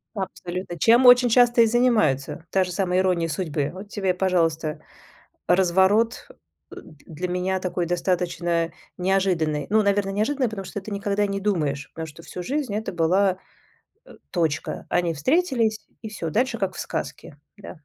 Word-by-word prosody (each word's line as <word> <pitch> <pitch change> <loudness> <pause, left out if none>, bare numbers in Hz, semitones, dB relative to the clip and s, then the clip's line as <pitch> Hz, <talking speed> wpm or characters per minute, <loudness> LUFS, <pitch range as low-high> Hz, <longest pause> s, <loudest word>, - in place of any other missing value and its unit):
Абсолютно! 180 -2 -5
Чем 235 +8 +5
очень 245 0 +7
часто 240 0 +5
и - - +7
занимаются. 220 - +1
Та 190 - +3
же 180 - -5
самая 185 -1 0
"Ирония 180 -3 +1
судьбы". 150 -3 -2
Вот 195 +2 -10
тебе, 195 -3 -1
пожалуйста, 165 -4 0 0.7
разворот 190 +6 +2 0.4
для 155 +4 -8
меня 180 +1 -1
такой 180 -1 -2
достаточно 170 -1 -1 0.3
неожиданный. 180 -6 0
Ну, 215 +2 +4
наверно, 200 -1 +1
неожиданный, 255 +6 0
потому 195 -3 -6
что 205 - -5
ты 210 - -9
никогда 200 0 0
не 195 0 -3
думаешь, 150 -9 -1
потому 160 - -5
что 160 +2 -13
всю 180 - -7
жизнь 270 -2 -2
это 215 -2 -3
была, 185 +3 +2 0.7
э, - - -14 0.2
точка. 160 -4 -2
Они 175 -1 +1
встретились, 235 - 0 0.2
и 220 - -5
всё, 185 -6 -5
дальше 240 - 0
как 190 -2 -2
в - - -10
сказке. 145 - -6 0.2
Да. 200 -4 -11
190 Hz, 155 wpm, -24 LUFS, 170-215 Hz, 0.7 s, очень